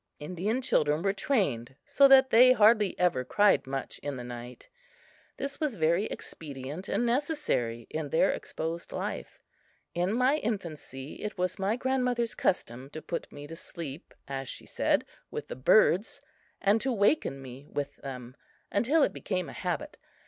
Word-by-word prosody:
Indian 185 Hz, -, -2 dB
children 150 Hz, -, +2 dB
were 195 Hz, -1 st, +2 dB
trained 145 Hz, -, 0 dB
so 280 Hz, -, +6 dB
that 265 Hz, -1 st, +7 dB
they 250 Hz, +3 st, +8 dB
hardly 215 Hz, -3 st, +4 dB
ever 175 Hz, -8 st, +2 dB
cried 205 Hz, +2 st, +3 dB
much 135 Hz, 0 st, -4 dB
in 145 Hz, -1 st, -4 dB
the 125 Hz, -, -6 dB
night. 120 Hz, 0 st, -9 dB, 0.7 s
This 275 Hz, +1 st, -4 dB
was 300 Hz, -7 st, -1 dB
very 170 Hz, +3 st, +2 dB
expedient 145 Hz, +1 st, -6 dB
and 240 Hz, -, +1 dB
necessary 235 Hz, -, 0 dB
in 155 Hz, -2 st, -4 dB
their 160 Hz, -, +3 dB
exposed 165 Hz, +2 st, -5 dB
life. -, -, -4 dB, 0.6 s
In 175 Hz, +2 st, 0 dB
my 255 Hz, +6 st, +3 dB
infancy 160 Hz, -, -5 dB
it 210 Hz, -1 st, -4 dB
was 180 Hz, +2 st, -1 dB
my 195 Hz, +3 st, +1 dB
grandmother's 250 Hz, -2 st, 0 dB
custom 130 Hz, -6 st, -1 dB
to 155 Hz, -, -6 dB
put 170 Hz, -, -4 dB
me 145 Hz, 0 st, -9 dB
to 165 Hz, +3 st, -8 dB
sleep, 165 Hz, -3 st, -8 dB
as 135 Hz, -2 st, -4 dB
she -, -, -6 dB
said, -, -, +1 dB, 0.2 s
with -, -, -5 dB
the -, -, -6 dB
birds, 185 Hz, -, +4 dB, 0.4 s
and 205 Hz, +3 st, +3 dB
to 265 Hz, -, 0 dB
waken 205 Hz, -, +2 dB
me 135 Hz, +2 st, -10 dB
with 145 Hz, -1 st, -3 dB
them, 130 Hz, -2 st, -8 dB, 0.4 s
until 280 Hz, +9 st, +3 dB
it -, -, +1 dB
became 185 Hz, -3 st, -3 dB
a -, -, -9 dB
habit. 185 Hz, -, -4 dB
180 Hz, 160 wpm, -29 LUFS, 140-235 Hz, 0.7 s, they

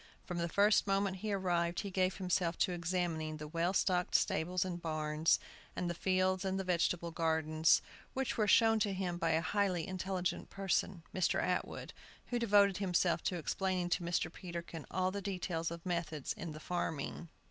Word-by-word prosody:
From 175 Hz, -1 st, -4 dB
the 170 Hz, 0 st, -1 dB
first 205 Hz, +3 st, +4 dB
moment 195 Hz, -1 st, +1 dB
he 210 Hz, +3 st, -3 dB
arrived 175 Hz, -3 st, 0 dB
he 200 Hz, -, -5 dB
gave 185 Hz, 0 st, +1 dB
himself 180 Hz, -2 st, 0 dB
to -, -, +2 dB
examining 170 Hz, -3 st, -2 dB
the 150 Hz, 0 st, -7 dB
well 170 Hz, +3 st, 0 dB
stocked 180 Hz, -2 st, +1 dB
stables 180 Hz, +3 st, +2 dB
and 175 Hz, -2 st, -4 dB
barns, 155 Hz, 0 st, +1 dB, 0.4 s
and 180 Hz, -, -2 dB
the 175 Hz, -, -1 dB
fields 185 Hz, +1 st, +1 dB
and 190 Hz, 0 st, -1 dB
vegetable 175 Hz, -2 st, 0 dB
gardens, 160 Hz, -1 st, +2 dB, 0.3 s
which 265 Hz, -1 st, -1 dB
were 215 Hz, -2 st, +1 dB
shown 225 Hz, +1 st, +5 dB
to 205 Hz, -2 st, +1 dB
him 180 Hz, -2 st, -2 dB
by 165 Hz, -, +1 dB
a 160 Hz, -, +2 dB
highly 185 Hz, -2 st, 0 dB
intelligent 185 Hz, -1 st, -2 dB
person, 190 Hz, -3 st, -1 dB
a -, -, -18 dB
Mr. 185 Hz, -, +2 dB
Atwood, -, -, -2 dB, 0.4 s
who 245 Hz, -, 0 dB
devoted 205 Hz, -4 st, +4 dB
himself 180 Hz, -3 st, +1 dB
to 180 Hz, -, 0 dB
explaining 180 Hz, +2 st, -1 dB
to 175 Hz, -, +1 dB
Mr. 170 Hz, -1 st, -1 dB
Peterkin 170 Hz, -3 st, -7 dB
all 185 Hz, +1 st, 0 dB
the 200 Hz, +1 st, -4 dB
details 180 Hz, -4 st, -2 dB
of 170 Hz, +1 st, -8 dB
methods 165 Hz, -5 st, -2 dB
in 170 Hz, -3 st, -6 dB
the 155 Hz, -, -8 dB
farming. 165 Hz, -1 st, -3 dB
180 Hz, 180 wpm, -34 LUFS, 165-190 Hz, 0.4 s, shown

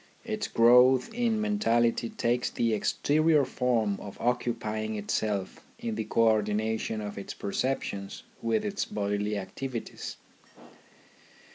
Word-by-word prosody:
Its 215 Hz, -2 st, -2 dB
growth 125 Hz, -, +5 dB
in 230 Hz, -2 st, +1 dB
mentality 120 Hz, -, +1 dB
takes 120 Hz, +1 st, 0 dB
the 115 Hz, -1 st, 0 dB
exterior 150 Hz, +6 st, +2 dB
form 120 Hz, -6 st, 0 dB
of 100 Hz, -, -9 dB
occupying 110 Hz, -3 st, -1 dB
itself 105 Hz, -1 st, -2 dB
in 230 Hz, -1 st, -3 dB
the -, -, -3 dB
co -, -, +1 dB
ordination 110 Hz, 0 st, 0 dB
of 105 Hz, -1 st, -5 dB
its 100 Hz, -, -7 dB
perceptions 100 Hz, -3 st, -3 dB, 0.2 s
with 115 Hz, -1 st, 0 dB
its 200 Hz, -1 st, -1 dB
bodily 105 Hz, 0 st, -2 dB
activities. 115 Hz, +5 st, -6 dB
115 Hz, 115 wpm, -28 LUFS, 105-135 Hz, 0.2 s, growth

